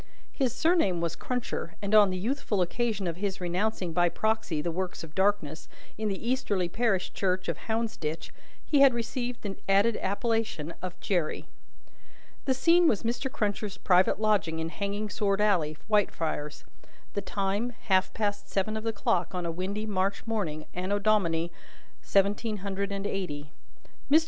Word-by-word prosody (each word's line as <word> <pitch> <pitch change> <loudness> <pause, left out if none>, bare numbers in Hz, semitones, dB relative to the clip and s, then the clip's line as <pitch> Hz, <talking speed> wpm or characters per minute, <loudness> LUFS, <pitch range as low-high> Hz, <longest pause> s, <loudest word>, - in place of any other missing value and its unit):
His 265 -4 0
surname 320 - +2
was 170 -1 -1
Cruncher, 245 -8 -3
and 200 +1 -3
on 210 -2 +8
the 185 - -2
youthful 215 -2 0
occasion 215 +1 -1
of 170 -1 -2
his 195 0 -2
renouncing 180 0 -1
by 175 +1 +4
proxy 220 -6 0
the 170 +3 -1
works 180 +1 -3
of 160 -1 -10
darkness, 190 -6 0 0.3
in 215 0 -2
the 200 +3 -3
easterly 210 -8 +1
parish 195 -1 0
church 185 -1 0
of - - 0
Hounsditch, 220 -8 -2 0.3
he 290 - +3
had 270 -3 +7
received 240 +1 -3
the 200 -2 -3
added 200 +3 +4
appellation 205 -6 -1
of 180 0 -6
Jerry. 175 -6 -1 1.0
The 265 - +2
scene 340 +5 +5
was 210 - +2
Mr. 240 +3 -1
Cruncher's 205 -2 -2
private 185 +2 +4
lodging 210 -7 +2
in 160 0 -2
Hanging 200 +4 -3
sword 205 -1 0
alley, 175 -8 +2
Whitefriars: 165 -8 0 0.5
the 200 - -1
time, 200 +4 -1
half 190 -3 +2
past 205 -2 -2
seven 200 +2 0
of 220 - -3
the 225 - 0
clock 180 -3 0
on 180 -1 -2
a 170 - -1
windy 195 +5 -3
March 195 -1 -1
morning, 175 -10 -2
Anno 185 +3 -1
Domini 175 -6 +2 0.5
seventeen 205 +2 +1
hundred 200 0 -2
and 200 0 -3
eighty. 155 -7 -3 0.6
(Mr. 305 +3 +7
200 Hz, 160 wpm, -29 LUFS, 180-220 Hz, 1.0 s, on